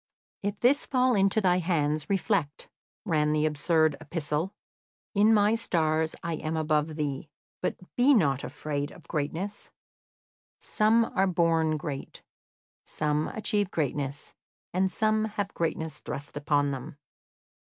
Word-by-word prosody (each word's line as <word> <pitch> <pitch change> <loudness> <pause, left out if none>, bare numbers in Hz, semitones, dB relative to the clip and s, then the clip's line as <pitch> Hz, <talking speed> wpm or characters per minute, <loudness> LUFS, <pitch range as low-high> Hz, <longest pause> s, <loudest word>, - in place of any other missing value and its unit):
"If 200 0 -3
this 265 +4 +3
fall 255 -1 +3
into 195 0 +3
thy 180 -2 +3
hands, 155 -4 0
reflect," 195 -6 0 0.4
ran 150 -5 +2
the 155 0 +2
absurd 155 0 +2
epistle. 155 +2 -2 0.6
"In 210 +2 +5
my 210 0 +4
stars 160 -8 +1
I 170 -2 -2
am 160 +1 -3
above 155 0 0
thee, 145 -1 -3 0.3
but - - -1 0.2
be 265 +3 +5
not 140 - +2
afraid 145 -1 -3
of 170 - -15
greatness; 170 +7 -3 0.9
some 225 +2 +3
are 195 +1 +3
born 165 -3 +2
great, 145 -3 -6 0.6
some 150 0 0
achieve 205 -2 -1
greatness, 140 -2 -3 0.4
and 185 +1 +1
some 215 +1 +1
have 205 -2 -3
greatness 160 -2 -2
thrust 145 +1 -7
upon 145 -1 +1
them. 135 +1 -6
160 Hz, 130 wpm, -28 LUFS, 150-200 Hz, 0.9 s, In